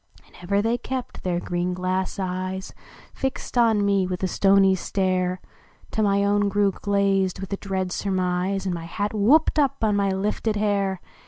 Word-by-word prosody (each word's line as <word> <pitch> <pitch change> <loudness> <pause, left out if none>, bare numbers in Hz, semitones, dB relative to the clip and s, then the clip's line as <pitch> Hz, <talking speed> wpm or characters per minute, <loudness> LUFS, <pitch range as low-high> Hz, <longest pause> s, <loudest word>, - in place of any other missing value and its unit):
And - - -25
ever 200 +3 0
they 230 +2 0
kept 260 +1 -5
their 175 -2 -1
green 175 +1 -2
glass 185 +2 -2
eyes 185 0 -4 0.4
Fixed 265 -1 -4
on 225 -4 +3
me 200 -2 +2
with 180 0 -4
a - - +2
stony 195 0 +4
stare 185 -1 -1 0.5
Till 220 - +1
my 200 0 +2
own 205 0 +2
grew 200 0 +2
glazed 195 -1 0
with 195 +1 -5
a - - -1
dread 190 -2 -3
surmise, 185 0 -1
And 185 - -1
my 165 -1 -5
hat 205 +5 -3
whooped 275 +10 +4
up 275 -5 +1
on 210 -2 +2
my 200 -1 +1
lifted 210 +3 -1
hair. 200 -2 0
195 Hz, 175 wpm, -24 LUFS, 185-205 Hz, 0.5 s, stony